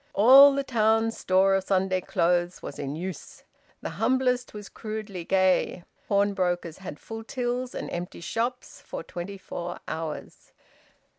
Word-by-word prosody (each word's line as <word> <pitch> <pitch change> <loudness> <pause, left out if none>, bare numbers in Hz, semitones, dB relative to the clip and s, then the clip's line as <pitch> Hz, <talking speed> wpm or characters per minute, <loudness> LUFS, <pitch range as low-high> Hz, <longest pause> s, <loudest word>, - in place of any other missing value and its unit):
All 270 +7 +9
the 280 - 0
town's 225 -2 +2
store 190 +1 +3
of 195 0 +1
Sunday 190 -1 +1
clothes 175 +1 0
was - - -7
in 140 0 -4
use. 180 +3 -7 0.4
The - - -3
humblest 250 -1 +1
was 210 -1 -9
crudely 215 -5 -6
gay. 185 -1 +2 0.2
Pawnbrokers 185 -5 0
had 185 -6 -8
full 225 0 -8
tills 245 +1 -3
and - - -4
empty 175 0 -5
shops, 235 +7 -3
for - - -7
twenty 185 +3 -7
four 175 -2 -6
hours. 160 -1 -6
195 Hz, 140 wpm, -26 LUFS, 180-230 Hz, 0.4 s, All